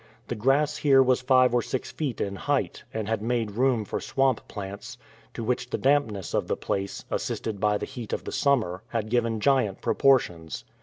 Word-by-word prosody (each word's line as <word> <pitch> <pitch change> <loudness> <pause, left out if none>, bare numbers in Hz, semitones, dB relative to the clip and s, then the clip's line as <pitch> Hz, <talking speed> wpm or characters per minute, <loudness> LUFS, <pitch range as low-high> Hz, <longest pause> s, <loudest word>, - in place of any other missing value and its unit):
The - - -1
grass 140 +6 +2
here 135 -3 +5
was 130 -1 +2
five 130 -1 +4
or 120 - +3
six 130 - -4
feet 140 -7 -3
in 100 0 -2
height, - - -1
and 110 -2 -3
had 110 -1 -1
made 115 -1 -1
room 120 0 +1
for - - -4
swamp 135 -3 0
plants, 100 -1 -7 0.4
to 115 - -4
which 125 +1 -1
the - - -1
dampness 130 -9 +1
of - - 0
the - - -1
place, 100 0 -3
assisted 110 -3 -3
by 105 0 +2
the - - -4
heat 120 -4 -8
of - - -2
summer, 115 -11 +1
had 110 -2 -3
given 115 -2 +1
giant 130 -6 +2
proportions. 90 -12 +1
120 Hz, 190 wpm, -26 LUFS, 105-130 Hz, 0.4 s, here